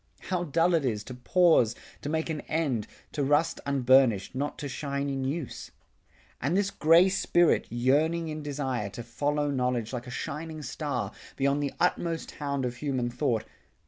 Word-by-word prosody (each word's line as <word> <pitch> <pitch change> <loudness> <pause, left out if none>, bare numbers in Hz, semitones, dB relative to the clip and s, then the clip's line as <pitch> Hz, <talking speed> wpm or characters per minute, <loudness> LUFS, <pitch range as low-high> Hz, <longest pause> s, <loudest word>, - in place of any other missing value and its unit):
How 180 -2 0
dull 165 +3 +2
it 165 -3 +3
is 110 -5 -1
to 125 - -8
pause, 125 -3 +3 0.3
to 145 - -4
make 160 +1 -1
an 155 - -3
end, 140 -9 0 0.2
To 145 - -1
rust 145 +4 +2
unburnished, 130 -6 +4
not 140 +3 -3
to 145 - -4
shine 140 0 -3
in 135 -1 -2
use! 145 +1 -4 0.7
And 160 +7 +1
this 200 0 +1
gray 165 +4 +5
spirit 175 -2 +3
yearning 150 +8 +2
in 155 0 -4
desire 135 -7 -2
To 120 +4 -7
follow 145 +4 -1
knowledge 125 -3 -1
like 125 0 -4
a - - -6
shining 155 +5 -5
star 125 -8 -3 0.2
Beyond 140 +1 +1
the 140 -2 -2
utmost 170 -2 0
hound 140 -2 -2
of 120 0 -3
human 130 -4 -1
thought. 120 -3 0
140 Hz, 170 wpm, -28 LUFS, 125-160 Hz, 0.7 s, gray